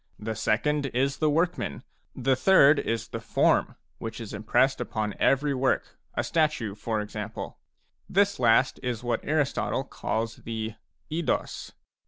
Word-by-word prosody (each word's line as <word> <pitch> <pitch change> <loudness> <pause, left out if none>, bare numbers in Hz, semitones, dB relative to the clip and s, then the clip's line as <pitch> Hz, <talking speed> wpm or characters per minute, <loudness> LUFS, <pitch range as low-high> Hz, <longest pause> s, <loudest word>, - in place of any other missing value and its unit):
The 110 +1 -4
second 145 +7 +1
is 135 +2 +1
the 155 - +2
workman. 165 +4 0 0.3
The 130 +1 +2
third 145 -3 +6
is 115 -1 -2
the - - -4
form, - - +2 0.2
which 115 0 -5
is 115 -3 -7
impressed 110 +6 +2
upon 105 -2 -2
every 140 +1 +3
work, 130 0 0
— - - -35
a - - +2
statue, 150 -10 0
for 110 +1 -2
example." 105 0 -6 0.5
This 200 +1 +2
last 120 +1 +4
is 120 -2 -3
what 120 -1 -1
Aristotle 145 -2 0
calls 115 -4 -3
the 110 -1 -4 0.4
jdos. 165 0 -2
125 Hz, 145 wpm, -27 LUFS, 110-145 Hz, 0.5 s, third